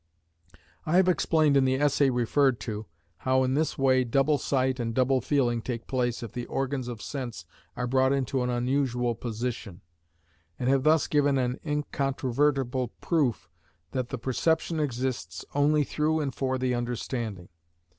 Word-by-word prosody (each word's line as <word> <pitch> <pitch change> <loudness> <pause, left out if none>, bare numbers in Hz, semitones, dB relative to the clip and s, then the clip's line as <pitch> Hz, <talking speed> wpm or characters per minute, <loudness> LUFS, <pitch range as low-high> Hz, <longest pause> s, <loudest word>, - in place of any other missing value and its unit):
I 160 - 0
have 185 0 +5
explained 160 -4 +3
in 135 - +5
the 130 0 +2
essay 145 0 +3
referred 125 +1 +2
to, 110 -2 -5 0.3
how 130 +5 +2
in 130 0 0
this 155 +3 0
way 130 -1 +3
double 135 +4 +2
sight 130 -1 0
and 115 -1 -2
double 130 0 +2
feeling 120 -3 +1
take 115 -1 -5
place 120 -2 -1
if 115 - -6
the 120 -1 -5
organs 135 -1 -2
of 115 -4 -6
sense 120 - -5 0.3
are 125 - -1
brought 130 +1 +2
into 135 -1 0
an 125 - -1
unusual 125 -1 0
position; 115 -4 -5 0.8
and 125 - -2
have 135 0 +3
thus 155 -1 +4
given 145 -2 +2
an 125 -1 -1
incontrovertible 135 -3 0
proof 125 - 0 0.4
that 130 -1 -1
perception 140 +7 -1
exists 125 - -3
only 150 +1 +3
through 155 +3 0
and 140 -4 -2
for 130 +1 -1
the 130 -1 0
understanding. 120 -5 -4
130 Hz, 155 wpm, -27 LUFS, 120-140 Hz, 0.8 s, have